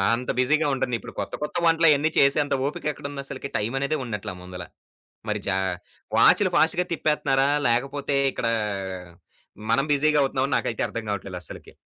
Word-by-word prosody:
అంత 125 +2 -3
బిజీగా 150 +5 +2
ఉంటందిప్పుడు 125 -3 -3
కొత్త - - -4
కొత్త 150 - -5
వంటలయన్ని 160 -2 +4
చేసేంత 140 +1 +3
ఓపికెక్కడుందసలకి? 140 -2 -4
టైమనేదే 135 +8 -1
ఉన్నట్ల 105 -5 -4
ముందల. 90 0 -8 0.7
మరి 105 0 -1
చా 95 - +1 0.6
వాచులు 205 -3 +5
ఫాస్ట్‌గా 175 +2 +3
తిప్పేత్తన్నారా, 140 -4 +1 0.2
లేకపోతే 135 +4 0 0.2
ఇక్కడా 115 -1 -1 1.2
మనం 115 +4 +3
బిజీగవుతున్నాం 140 -2 +2
నాకైతే 115 - -1
అర్థం 115 - -5
గావట్లేదస్సలకి. 95 -3 -6
135 Hz, 115 wpm, -24 LUFS, 115-150 Hz, 1.2 s, వాచులు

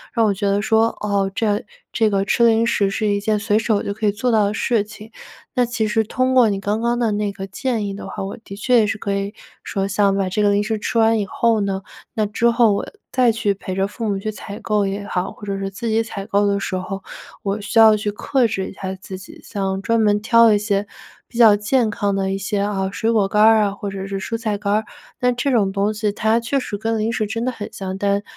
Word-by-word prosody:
那 230 - +3
我 215 - +3
觉 200 - -3
得 200 +1 +2
说， 220 +1 +3
哦 200 -2 0
这 210 0 0 0.3
这 220 -2 +2
个 195 0 +1
吃 235 +3 +3
零 225 0 +4
食 200 -4 +2
是 215 +1 -1
一 205 0 +1
件 210 +1 0
随 210 0 +1
手 220 -2 +1
就 - - -3
可 215 +1 -4
以 205 - +4
做 235 +4 -1
到 215 -2 +4
的 205 - -1
事 225 -1 +1
情。 215 +1 -13 0.4
那 250 -1 +2
其 235 -2 -1
实 220 +1 +1
通 255 +4 0
过 245 -4 +5
你 195 -1 -1
刚 205 +3 -1
刚 235 +1 +1
的 225 -3 +1
那 205 0 -1
个 195 0 -7
建 225 +1 -2
议 195 - -4
的 200 - -8
话， - - -5
我 195 - -6
的 195 - -9
确 245 +4 +2
也 215 - +3
是 215 - -2
可 200 -1 -3
以 200 +2 -3 0.3
说 195 -1 -2
像 200 0 +2
把 195 -1 0
这 200 +3 -1
个 205 - +4
零 200 0 +2
食 220 +1 -1
吃 220 +2 -3
完 225 0 +4
以 205 - -1
后 225 +2 +1
呢， 195 -1 -2 0.3
那 220 -3 0
之 230 +3 +1
后 230 -3 +4
我 - - -2 0.3
再 250 -3 +4
去 215 -2 0
陪 190 -1 -6
着 195 +1 +1
父 220 +1 -4
母 195 -1 -1
去 215 - -4
采 200 0 -8
购 210 -2 0
也 200 +1 -4
好， 180 -1 -2
或 205 - -11
者 195 -1 -3
是 195 0 -3
自 230 +4 -6
己 225 +1 +2
采 200 -3 -7
购 205 -1 +1
的 200 0 +1
时 190 - -3
候， 195 +1 -4 0.4
我 200 +1 -1
需 205 +3 +1
要 220 -1 +8
去 210 0 -2
克 250 +4 0
制 195 -3 -3
一 - - -10
下 190 -1 -5
自 190 0 -9
己， 190 - -13
像 195 -2 -3
专 230 +3 +1
门 210 -1 +2
挑 230 0 +5
一 205 - +4
些 205 -1 -1 0.4
比 235 - -11
较 225 -3 +7
健 220 +3 +1
康 205 -1 -1
的 190 -1 -1
一 195 - -1
些， 200 +1 -2
啊， 195 -2 -1
水 225 +3 0
果 210 -4 +2
干 210 +2 +1
儿 220 0 +6
啊 200 - 0
或 200 0 -5
者 195 0 -5
是 195 0 -3
蔬 230 +3 -3
菜 215 -3 -2
干 200 0 -2
儿， 215 0 +1 0.3
那 250 -1 +2
这 245 +3 -1
种 205 -6 +2
东 200 +2 0
西 210 -1 -1
它 220 +2 +2
确 255 +4 -1
实 205 - -4
跟 225 +2 -1
零 220 +2 0
食 220 -2 -1
真 225 +2 -3
的 255 - 0
很 215 -4 -7
像， 190 -1 -5
但， 200 +1 0
210 Hz, 290 characters per minute, -20 LUFS, 200-225 Hz, 0.4 s, 要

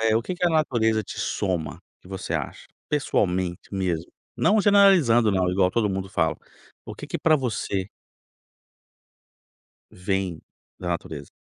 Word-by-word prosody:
eh, 110 0 +3
o 115 - 0
que 180 - -4
que 180 - -2
a - - +2
natureza 120 -9 +2
te - - -9
soma, 90 -6 -2 0.2
que - - -17
você 95 -1 -5
acha? - - -4 0.2
Pessoalmente, 95 -12 -1
mesmo. 90 -4 -2 0.3
Não 215 +1 +3
generalizando, 185 - +5
não, 90 -1 +1
igual 90 0 +2
todo 110 -1 +1
mundo 95 0 -3
fala. 80 -4 0 0.5
O - - -8
que - - -9
que - - -4
pra 160 -1 +4
você 105 -7 -2 2.0
vem 95 -3 -3 0.4
da 90 - -5
natureza? 80 -4 -5
100 Hz, 145 wpm, -24 LUFS, 90-120 Hz, 2.0 s, generalizando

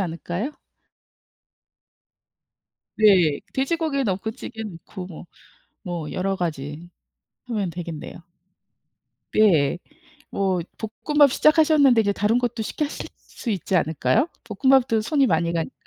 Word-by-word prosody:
않을까요? 175 - -3 2.4
네. 185 -9 +4
돼지고기 280 0 0
넣고 200 +2 -1
찌개 225 -2 -8
넣고 180 -1 -8
뭐 175 -1 -10 0.6
뭐 170 -4 -4
여러 195 +1 -1
가지 150 0 -4 0.6
하면 210 -7 -2
되겠네요. 170 -1 -7 1.2
예. 175 -8 +4 0.5
뭐 190 -3 0 0.4
볶음밥 295 -3 +5
시작하셨는데 305 -6 +5
인제 200 -1 +1
다른 210 +4 +1
것도 240 -2 -2
쉽게 300 - -2
하실 290 - -6
수 240 - -7
있지 190 -2 -1
않을까요, 165 - +1 0.2
볶음밥도 240 +1 +3
손이 275 +4 +2
많이 170 -3 +1
가니까? 165 -1 -2
200 Hz, 250 characters per minute, -23 LUFS, 175-255 Hz, 2.4 s, 볶음밥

